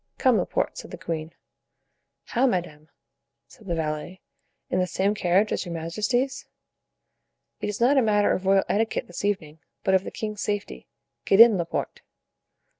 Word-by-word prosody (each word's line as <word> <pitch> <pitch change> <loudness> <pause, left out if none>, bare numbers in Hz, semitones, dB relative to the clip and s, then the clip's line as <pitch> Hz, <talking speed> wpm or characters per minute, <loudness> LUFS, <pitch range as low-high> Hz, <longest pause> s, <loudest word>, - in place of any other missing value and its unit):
"Come, - - +3
Laporte," - - -2
said - - -9
the - - -8
queen. 160 -1 -4 0.9
"How, 255 +3 +1
madame!" 165 - -3 0.6
said 215 - -17
the 170 - -1
valet, 155 +3 -4 0.5
"in 185 - +1
the 180 - +1
same 190 +4 0
carriage 195 +1 +2
as - - -1
your 175 -2 -6
majesties?" 215 +11 -1 1.1
"It - - -2
is 205 - -4
not 265 +4 +4
a - - +4
matter 210 -3 +3
of 190 - -3
royal 195 0 +5
etiquette 220 +2 0
this 175 - -8
evening, 160 -7 -2 0.2
but 190 - +2
of 190 0 +4
the - - -5
king's 215 -2 -5
safety. 205 -1 -4 0.4
Get 195 - +3
in, 230 -2 +9
Laporte." 170 -2 -3
195 Hz, 165 wpm, -25 LUFS, 170-215 Hz, 1.1 s, in